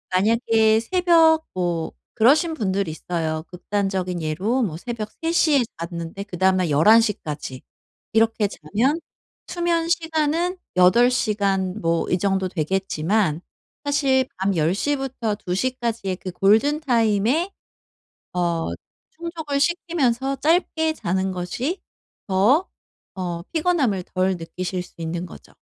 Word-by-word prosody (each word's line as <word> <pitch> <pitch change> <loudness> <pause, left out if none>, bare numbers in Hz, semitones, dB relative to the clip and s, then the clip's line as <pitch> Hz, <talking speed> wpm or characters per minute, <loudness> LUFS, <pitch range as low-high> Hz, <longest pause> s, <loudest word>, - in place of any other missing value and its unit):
만약에 220 +2 +3
새벽 325 +1 +4
뭐 175 -3 -1 0.2
그러신 295 +9 +4
분들이 195 - -1
있어요. 160 -1 -3
극단적인 185 -1 -2
예로 190 +12 0
뭐 165 -8 -3
새벽 220 +2 -5
3:00 330 0 0
시에 305 -6 +4 0.2
잤는데 170 +2 -5
그다음 190 -1 +1
날 180 -3 0
11:00 215 +9 +5
까지 145 -4 -6 0.5
이렇게 225 -1 +3
자면 225 - -1 0.5
수면 340 -1 0
시간은 330 +1 0 0.2
8 235 +8 +6
시간 200 -5 0
뭐 165 0 0
이 180 - +3
정도 190 0 +1
되겠지만 185 0 0 0.4
사실 275 -2 +2
밤 190 +1 0
10:00 185 - +1
부터 255 -5 -3
2:00 195 +5 -1
까지의 225 -5 -2
그 185 -1 -6
골든타임에 235 - +2 0.8
어 170 -2 0 0.4
충족을 330 -8 -4
시키면서 275 -6 0
짧게 320 0 +1
자는 190 - -1
것이 235 - -3 0.5
더 220 - +3 0.5
어 175 -3 -4
피곤함을 305 - +1
덜 185 0 +1
느끼실 180 +2 -4
수 - - -17
있는 170 +2 -3
거죠. 175 - -13
210 Hz, 230 characters per minute, -22 LUFS, 180-285 Hz, 0.8 s, 8